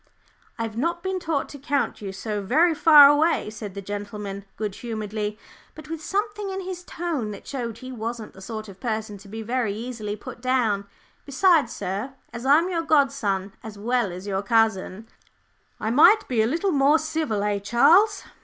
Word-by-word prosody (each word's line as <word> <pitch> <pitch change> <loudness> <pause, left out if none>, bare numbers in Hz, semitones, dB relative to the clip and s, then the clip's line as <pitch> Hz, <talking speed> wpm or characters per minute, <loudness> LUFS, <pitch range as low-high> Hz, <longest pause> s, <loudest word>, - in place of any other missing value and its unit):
"I've 225 -2 -4
not 340 +5 -1
been 380 0 -2
taught 320 -5 -1
to 285 - -10
count 280 -3 -1
you 195 -2 -5
so 210 +2 -4
very 315 - +3
far 300 -2 +9
away," 290 -5 +2
said 210 -3 -8
the 200 - -6
gentleman, 205 0 -6
good 210 -2 -3
humouredly, 215 -2 -4 0.4
but 310 0 -11
with 325 -1 -5
something 415 +1 -2
in 385 0 -4
his 365 -1 -6
tone 330 -11 -3
that 205 - -9
showed 235 -5 -5
he 255 +1 -9
wasn't 230 -2 -5
the 190 - -14
sort 215 +2 -6
of 195 -2 -12
person 220 -3 -3
to 200 - -15
be 220 +2 -6
very 235 -3 -1
easily 220 -2 -5
put 215 - -10
down; 230 -6 +1 0.4
"besides, 290 -2 +3
sir, 205 +9 -4 0.2
as 235 +2 -5
I'm 310 +5 +5
your 345 -3 -1
godson 275 -11 +1
as 220 -2 -9
well 235 -1 0
as 180 +2 -8
your 195 -1 -1
cousin 220 -1 +1 0.4
" - - -41
"I 220 - -1
might 405 - +6
be 240 -4 +1
a 220 - +2
little 340 - 0
more 285 0 +4
civil, 315 -10 -2
eh, 205 -1 0
Charles?" 315 - +4
235 Hz, 185 wpm, -24 LUFS, 210-310 Hz, 0.4 s, far